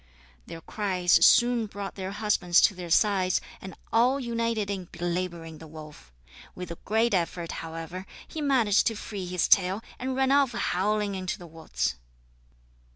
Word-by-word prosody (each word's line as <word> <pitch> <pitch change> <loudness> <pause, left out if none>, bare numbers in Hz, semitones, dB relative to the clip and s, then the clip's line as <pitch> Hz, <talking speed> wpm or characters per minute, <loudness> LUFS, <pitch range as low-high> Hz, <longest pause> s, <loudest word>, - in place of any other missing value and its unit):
Their 165 - -8
cries 185 -2 +1
soon 240 -2 +5
brought 200 -1 -6
their 190 -1 -5
husbands 200 -4 +2
to 210 - +4
their 180 -2 -8
sides, 185 0 +3 0.2
and 190 -2 -9 0.2
all 250 +4 +3
united 230 -4 -1
in 190 -2 -4
belabouring 170 -2 -4
the 160 - -11
wolf. 150 - -12 0.4
With 180 -2 -7
a 170 - -8
great 220 +2 +2
effort, 170 -2 -1
however, 165 +3 -7 0.2
he 315 - -6
managed 245 -8 +3
to 225 - 0
free 200 -3 -6
his 180 -1 0
tail, 190 +3 +3 0.2
and 260 +1 -3
ran 265 0 +2
off 275 -3 +3
howling 210 -1 0
into 185 -1 -3
the 175 - -11
woods. 160 - -3
190 Hz, 155 wpm, -27 LUFS, 175-225 Hz, 0.4 s, soon